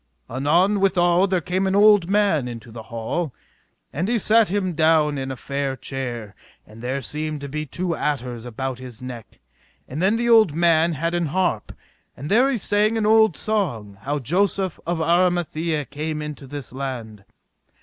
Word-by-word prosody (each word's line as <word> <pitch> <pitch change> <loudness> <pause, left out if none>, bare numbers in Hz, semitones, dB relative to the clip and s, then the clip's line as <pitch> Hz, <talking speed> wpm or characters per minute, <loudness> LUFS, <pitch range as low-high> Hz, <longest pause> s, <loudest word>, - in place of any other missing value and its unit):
Anon 170 - +2
withal 180 -1 +3
there 185 -2 0
came 185 +3 -1
an 190 - +1
old 205 -3 +5
man 195 -10 +2
into 115 -1 -8
the 115 0 -8
hall, 120 +7 -3 0.6
and 170 +8 -1
he 235 +1 +1
sat 220 0 +4
him 190 -2 -1
down 155 -2 +3
in 135 0 -4
a 130 - -4
fair 140 +1 -3
chair, 120 -6 -5 0.3
and 110 +2 -14
there 130 +3 -2
seemed 150 +3 -4
to 140 - -5
be 155 +2 -4
two 175 +4 -2
adders 125 -5 -3
about 125 +1 -4
his 125 -3 -10
neck; 125 -4 -9 0.5
and 145 +6 -5
then 195 +4 +3
the 235 +1 0
old 220 -9 +5
man 165 0 +3
had 165 +3 -2
an 175 -2 0
harp, 175 - -1 0.5
and 145 +4 -6
there 250 +6 +5
he 270 - 0
sang 210 +2 +1
an 220 - 0
old 220 -4 +4
song 120 - -2
how 145 +2 -2
Joseph 185 - 0
of 175 0 0
Armathie 165 -2 +1
came 155 +2 -3
into 150 -2 -7
this 140 -2 -7
land. 120 -6 -6
155 Hz, 175 wpm, -22 LUFS, 130-190 Hz, 0.6 s, old